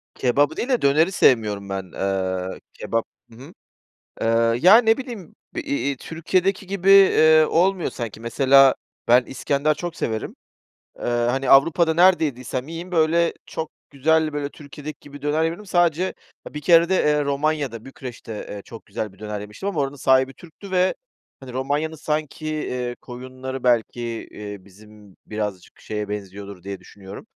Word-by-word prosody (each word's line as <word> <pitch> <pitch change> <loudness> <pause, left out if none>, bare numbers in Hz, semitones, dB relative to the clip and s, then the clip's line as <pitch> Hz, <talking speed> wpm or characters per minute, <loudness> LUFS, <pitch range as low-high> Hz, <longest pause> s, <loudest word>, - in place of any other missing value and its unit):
Kebabı 145 +5 +2
değil 250 - -3
de, 250 -3 +2
döneri 155 +6 +3
sevmiyorum 105 - +2
ben. 95 0 -3
Iııı, 95 -1 -2
kebap 115 0 -2 0.3
Hı - - -15
hı. 140 +8 -12 0.7
Iıı, 115 0 +2
ya, 190 +5 +9
ne 225 -2 +4
bileyim, 230 -6 -8 0.2
iii, 330 - -2
iii, 280 - -2
Türkiye'deki 185 +6 -1
gibi, 195 0 +6
ııı, 155 0 +6
olmuyor 185 +1 +2
sanki. 115 -3 -6
Mesela 135 +3 +5 0.3
ben 125 +2 +6
İskender 140 +3 0
çok 170 +3 -6
severim. 110 -7 -3 0.6
Iıı, 120 0 0
hani, 135 +1 -1
Avrupa'da 160 +4 +5
nerede 175 0 +5
yediysem 130 -1 -4
yiyeyim, 165 +3 -7
böyle, 165 0 +2
çok 160 -1 -5 0.2
güzel, 155 +2 +1
böyle, 145 -1 -3
Türkiye'deki 150 +1 -10
gibi 145 0 -12
döner 150 +2 +1
yemedim. 170 +6 -3
Sadece, 175 -1 +1 0.4
bir 150 - -7
kerede, 170 +2 +5
eee, 150 -4 +2
Romanya'da, 140 -4 -1
Bükreş'te, 125 -3 -9 0.2
eee, 105 - -6
çok 115 - -11
güzel 105 -3 -5
bir - - -22
döner 105 -1 -5
yemiştim 105 - -5
ama 180 -7 -3
oranın 140 0 -1
sahibi 130 -1 +3
Türk'tü 175 +5 -13
ve, 185 0 +2 0.4
hani, 130 -2 -10
Romanya'nın 145 +5 -1
sanki, 155 0 -3
iii, 125 -5 -3
koyunları 130 +1 -7
belki, 120 -1 0
iii, 105 -2 -8
bizim 105 0 -17
birazcık 105 -4 -5
şeye 105 -1 -4
benziyordur 100 -2 -7
diye 100 0 -6
düşünüyorum. 100 - -12
140 Hz, 155 wpm, -22 LUFS, 115-165 Hz, 0.7 s, ya